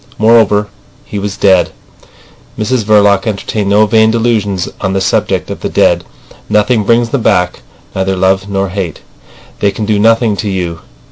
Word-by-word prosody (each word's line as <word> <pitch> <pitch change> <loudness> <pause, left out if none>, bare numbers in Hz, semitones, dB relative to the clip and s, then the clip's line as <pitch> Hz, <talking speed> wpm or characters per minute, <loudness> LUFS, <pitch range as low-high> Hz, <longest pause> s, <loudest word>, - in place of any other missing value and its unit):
Moreover, 110 -2 +3 0.4
he 105 - -5
was 100 0 -4
dead. 95 -3 +3 0.9
Mrs 115 +2 -1
Verloc 100 -1 +3
entertained 105 -1 -2
no 105 +2 +4
vain 110 +1 +3
delusions 110 -5 0
on 95 -1 -1
the 95 - 0
subject 95 - -1
of - - -6
the - - -4
dead. - - +2 0.5
Nothing 105 +1 +1
brings 115 +2 +2
them 135 +1 -1
back, 90 -4 +1 0.4
neither 95 0 -1
love 95 +1 0
nor 95 -1 -1
hate. 90 -4 -5 0.6
They 100 - +2
can 105 +2 -4
do 105 -1 0
nothing 115 0 +3
to 105 - -3
you. 90 -4 -3
105 Hz, 160 wpm, -12 LUFS, 95-110 Hz, 0.9 s, no